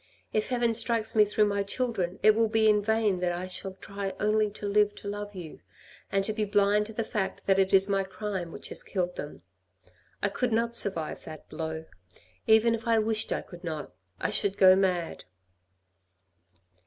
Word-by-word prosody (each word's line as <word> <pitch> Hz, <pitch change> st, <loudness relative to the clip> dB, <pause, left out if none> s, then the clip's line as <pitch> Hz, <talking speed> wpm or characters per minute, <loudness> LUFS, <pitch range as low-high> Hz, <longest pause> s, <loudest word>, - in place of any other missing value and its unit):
If 215 Hz, -1 st, 0 dB
heaven 240 Hz, -2 st, +1 dB
strikes 225 Hz, -1 st, 0 dB
me 210 Hz, -1 st, +6 dB
through 210 Hz, +1 st, +2 dB
my 200 Hz, -1 st, 0 dB
children, 200 Hz, -4 st, -2 dB
it 215 Hz, -, +7 dB
will 225 Hz, +1 st, +2 dB
be 220 Hz, 0 st, +2 dB
in 210 Hz, -1 st, +4 dB
vain 215 Hz, -3 st, +1 dB
that 180 Hz, -1 st, 0 dB
I 175 Hz, +1 st, -4 dB
shall 185 Hz, +1 st, -4 dB
try 195 Hz, 0 st, -6 dB
only 210 Hz, 0 st, +2 dB
to 205 Hz, 0 st, -9 dB
live 205 Hz, 0 st, +2 dB
to -, -, -9 dB
love 205 Hz, 0 st, -5 dB
you, 170 Hz, -4 st, -8 dB, 0.5 s
and 195 Hz, 0 st, +1 dB
to 215 Hz, -, 0 dB
be 215 Hz, 0 st, -1 dB
blind 205 Hz, 0 st, +2 dB
to 220 Hz, -, -10 dB
the 230 Hz, -, -2 dB
fact 210 Hz, -3 st, -3 dB
that 195 Hz, 0 st, +3 dB
it 190 Hz, 0 st, +2 dB
is 195 Hz, 0 st, +6 dB
my 195 Hz, -1 st, +1 dB
crime 190 Hz, -3 st, -5 dB
which -, -, -7 dB
has -, -, -3 dB
killed 180 Hz, -2 st, -3 dB
them. 145 Hz, -11 st, -8 dB, 0.8 s
I 200 Hz, -, +2 dB
could 245 Hz, +4 st, -1 dB
not 230 Hz, +1 st, 0 dB
survive 180 Hz, -8 st, 0 dB
that 155 Hz, -1 st, -10 dB
blow. 160 Hz, 0 st, -5 dB, 0.6 s
Even 220 Hz, +1 st, +5 dB
if 230 Hz, +1 st, -4 dB
I 230 Hz, -1 st, +4 dB
wished 220 Hz, 0 st, 0 dB
I -, -, -1 dB
could 175 Hz, 0 st, -13 dB
not; 155 Hz, -3 st, -5 dB, 0.3 s
I -, -, -1 dB
should 200 Hz, 0 st, +1 dB
go 185 Hz, -1 st, +7 dB
mad." 180 Hz, -3 st, -1 dB
205 Hz, 195 wpm, -28 LUFS, 190-220 Hz, 0.8 s, it